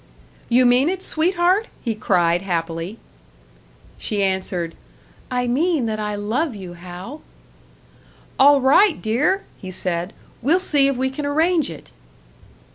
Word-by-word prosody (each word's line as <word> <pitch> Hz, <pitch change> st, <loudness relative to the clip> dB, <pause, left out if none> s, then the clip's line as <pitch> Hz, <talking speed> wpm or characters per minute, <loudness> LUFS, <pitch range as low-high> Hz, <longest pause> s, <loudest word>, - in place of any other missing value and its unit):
"You 250 Hz, +1 st, +4 dB
mean 250 Hz, +5 st, +4 dB
it, 375 Hz, 0 st, -3 dB
sweetheart?" 360 Hz, +6 st, +2 dB, 0.2 s
he 230 Hz, -, -1 dB
cried, 175 Hz, -5 st, +1 dB
happily. 170 Hz, +1 st, -3 dB, 1.0 s
She 205 Hz, -2 st, -1 dB
answered, 185 Hz, -3 st, -1 dB, 0.6 s
"I 250 Hz, -1 st, -1 dB
mean 290 Hz, +3 st, +1 dB
that 215 Hz, -1 st, -2 dB
I 210 Hz, -1 st, -2 dB
love 230 Hz, +7 st, -2 dB
you, 185 Hz, -3 st, -8 dB
Hal." 180 Hz, -, -9 dB, 1.2 s
"All 280 Hz, 0 st, +6 dB
right, 315 Hz, +8 st, +4 dB
dear!" 285 Hz, -, 0 dB
he 190 Hz, -, -8 dB
said. 180 Hz, 0 st, -3 dB, 0.3 s
"We'll 310 Hz, +9 st, +3 dB
see 290 Hz, -7 st, +3 dB
if 275 Hz, -2 st, -1 dB
we 260 Hz, +1 st, 0 dB
can 285 Hz, +2 st, -4 dB
arrange 320 Hz, +1 st, +2 dB
it." -, -, -11 dB
245 Hz, 130 wpm, -21 LUFS, 190-300 Hz, 1.2 s, All